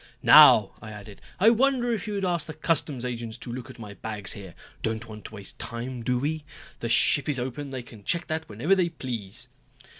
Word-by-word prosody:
"Now," - - +8
I 110 - -9
added, 105 -1 -11 0.2
"I 220 +5 +6
wonder 245 0 +2
if 215 -3 -4
you 210 - -3
would 195 -1 -1
ask 170 -4 -1
the 155 - -7
customs 150 -5 +1
agents 120 -2 -5
to 120 0 -7
look 125 0 -7
at - - -11
my 105 -3 -9
bags 105 0 -5
here. 95 -4 -10 0.3
Don't 110 +1 -3
want 110 -1 -11
to 110 - -9
waste 100 -2 -11
time, 120 +1 -5
do 125 +2 0
we? 150 +4 -2 0.4
The 115 - -3
ship 135 +4 +3
is 145 - 0
open, 130 +3 -4
they 130 -2 -6
can 115 -3 -14
check 170 - -1
that 160 0 -4
whenever 120 - +1
they 180 -3 +2
please." 120 - -7
125 Hz, 215 wpm, -26 LUFS, 110-160 Hz, 0.4 s, Now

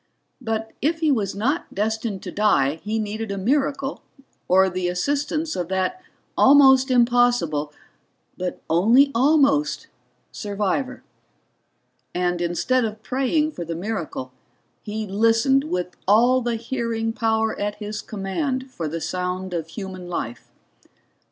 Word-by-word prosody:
But 225 -2 -3
if 320 +4 +1
he 315 -2 +3
was 205 -7 0
not 270 +11 -1
destined 220 -1 -2
to - - -6
die 160 -8 +2
he 215 +2 -2
needed 215 0 -3
a 200 - -3
miracle 275 +5 0 0.5
or 190 +1 +5
the 185 -1 -2
assistance 290 - -1
of 175 - -2
that 190 - -1 0.3
almost 265 -1 +6
impossible 240 - +2 0.6
but 180 0 -5
only 230 - +4
almost 285 +3 +2 0.4
survivor. 210 +5 -2 1.1
And 175 -1 0
instead 210 +9 +1
of 215 -1 -4
praying 275 +5 0
for 175 - -6
the 165 0 -5
miracle, 170 -9 -4 0.5
he 215 +1 -4
listened 230 +7 +3
with 180 - -3
all 240 +5 +5
the 240 -1 -1
hearing 230 -1 -2
power 220 0 0
at 205 0 -2
his 210 0 -5
command 255 +7 -3
for 170 -10 -4
the 165 +2 -4
sound 180 +1 -3
of 165 -2 -3
human 185 0 -7
life. 120 -9 -5
220 Hz, 130 wpm, -23 LUFS, 185-260 Hz, 1.1 s, almost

